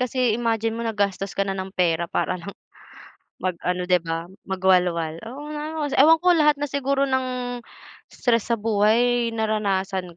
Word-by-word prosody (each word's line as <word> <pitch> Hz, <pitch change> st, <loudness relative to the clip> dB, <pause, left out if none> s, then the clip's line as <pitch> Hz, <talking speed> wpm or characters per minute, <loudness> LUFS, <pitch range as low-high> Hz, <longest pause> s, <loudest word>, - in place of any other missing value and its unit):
kasi 250 Hz, -2 st, +1 dB
imagine 225 Hz, -1 st, 0 dB
mo 230 Hz, -, -5 dB
naggastos 200 Hz, -3 st, -2 dB
ka 200 Hz, -, +1 dB
na 195 Hz, -, -2 dB
ng 190 Hz, 0 st, -5 dB
pera 170 Hz, -1 st, +1 dB
para 185 Hz, -1 st, -1 dB
lang 200 Hz, +3 st, -9 dB, 0.8 s
mag-ano, 180 Hz, 0 st, -2 dB
'di 180 Hz, 0 st, +3 dB
ba, 165 Hz, 0 st, -4 dB, 0.2 s
mag-walwal, 180 Hz, -4 st, +1 dB
oo 265 Hz, +5 st, -8 dB
nga, 300 Hz, 0 st, -4 dB, 0.2 s
os 290 Hz, -, -3 dB
ewan 310 Hz, +5 st, +6 dB
ko 360 Hz, -, +6 dB
lahat 300 Hz, -3 st, +4 dB
na 290 Hz, -, -3 dB
siguro 275 Hz, -1 st, 0 dB
ng 255 Hz, -2 st, -2 dB, 0.5 s
stress 235 Hz, -3 st, 0 dB
sa 235 Hz, -, +2 dB
buhay 230 Hz, +3 st, +2 dB
naranasan 195 Hz, -5 st, -1 dB
215 Hz, 160 wpm, -23 LUFS, 185-250 Hz, 0.8 s, ewan